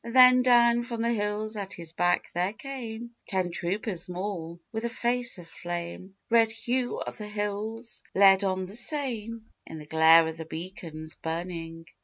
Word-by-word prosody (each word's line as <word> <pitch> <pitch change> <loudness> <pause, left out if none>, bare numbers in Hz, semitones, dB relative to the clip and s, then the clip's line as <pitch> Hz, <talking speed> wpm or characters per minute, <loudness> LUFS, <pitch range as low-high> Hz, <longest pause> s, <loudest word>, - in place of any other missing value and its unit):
Then 250 +1 +7
down 240 -1 +5
from 235 -2 -3
the 235 0 +2
hills 210 0 -2
at 200 -2 -5
his 165 -1 -7
back 175 +1 +1
there 180 +4 0
came 235 -2 -7 0.2
Ten 185 -2 -1
troopers 180 +2 -3
more. 180 -2 -4
With 225 0 -3
a 235 - 0
face 240 0 0
of 175 -2 -11
flame 175 +3 -6 0.2
Red 225 -1 +5
Hugh 245 +2 -1
of - - -6
the 210 - -5
Hills 210 +3 -3
led 195 0 +7
on 190 -1 0
the 195 +3 -10
same, 230 -4 -3 0.2
In 160 - -8
the 150 - -9
glare 160 +2 +6
of 160 0 -4
the 160 - -6
beacon's 160 -2 -7
burning. 165 0 -5
205 Hz, 170 wpm, -28 LUFS, 175-235 Hz, 0.2 s, Then